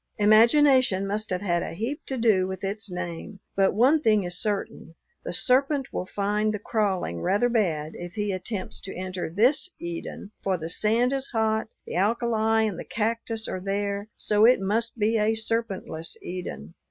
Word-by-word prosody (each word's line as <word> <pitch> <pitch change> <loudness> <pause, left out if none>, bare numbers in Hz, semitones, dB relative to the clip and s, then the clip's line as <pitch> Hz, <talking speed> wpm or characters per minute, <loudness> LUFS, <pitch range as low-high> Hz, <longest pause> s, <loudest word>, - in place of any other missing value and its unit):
Imagination 230 0 +5
must 210 +2 -3
have 185 0 -2
had 175 -4 0
a - - -5
heap 235 - -3
to 265 - -3
do 215 -6 +3
with 190 0 -6
its 205 +2 -3
name, 180 +3 -6 0.2
but 195 -1 +3
one 270 +8 +4
thing 215 -6 +3
is 175 0 -4
certain: 205 -5 -3 0.3
the - - -4
serpent 275 +1 +2
will 185 - -3
find 210 +2 0
the - - -2
crawling 195 - -1
rather 205 - +2
bad 165 -10 0
if 175 0 -8
he 210 -1 -1
attempts 190 +1 -4
to 195 - -7
enter 185 -1 -4
this 245 - +2
Eden, 170 +4 -6
for 190 -2 0
the 165 0 -5
sand 230 +7 +2
is 270 0 -1
hot; 220 -2 0 0.2
the - - -7
alkali 220 +2 +2
and 195 -5 -4
the - - -5
cactus 225 0 -2
are 185 - -4
there, 200 +1 -2
so 210 0 +2
it 245 +3 +6
must 225 +5 -1
be 220 +1 +2
a 215 +1 +2
serpentless 220 -8 -2
Eden. 175 - -6
210 Hz, 175 wpm, -26 LUFS, 185-230 Hz, 0.3 s, it